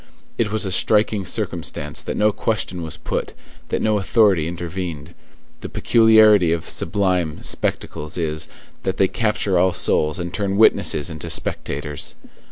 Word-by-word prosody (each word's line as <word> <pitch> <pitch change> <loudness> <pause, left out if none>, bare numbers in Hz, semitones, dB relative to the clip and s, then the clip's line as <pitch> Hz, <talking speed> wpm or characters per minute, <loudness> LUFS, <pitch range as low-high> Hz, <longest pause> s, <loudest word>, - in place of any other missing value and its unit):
It 110 -3 +1
was 110 -1 +1
a 95 - -2
striking 105 0 +2
circumstance - - -3
that - - -4
no 105 0 +3
question 110 -5 -2
was 80 0 -6
put, - - -4 0.4
that - - -1
no 110 -1 +2
authority 100 -6 +3
intervened. 85 -3 -6 0.5
The - - -7
peculiarity 110 -6 +5
of 85 -1 -2
sublime 90 -6 -1
spectacles 75 +3 -2
is, 80 -2 -1 0.3
that 95 0 -2
they 95 - +4
capture 105 -4 0
all 90 0 +3
souls 75 -2 +1
and 85 0 -5
turn 100 -1 -1
witnesses 85 -6 +3
into 80 -2 -6
spectators. 75 +1 -2
95 Hz, 145 wpm, -21 LUFS, 85-105 Hz, 0.5 s, peculiarity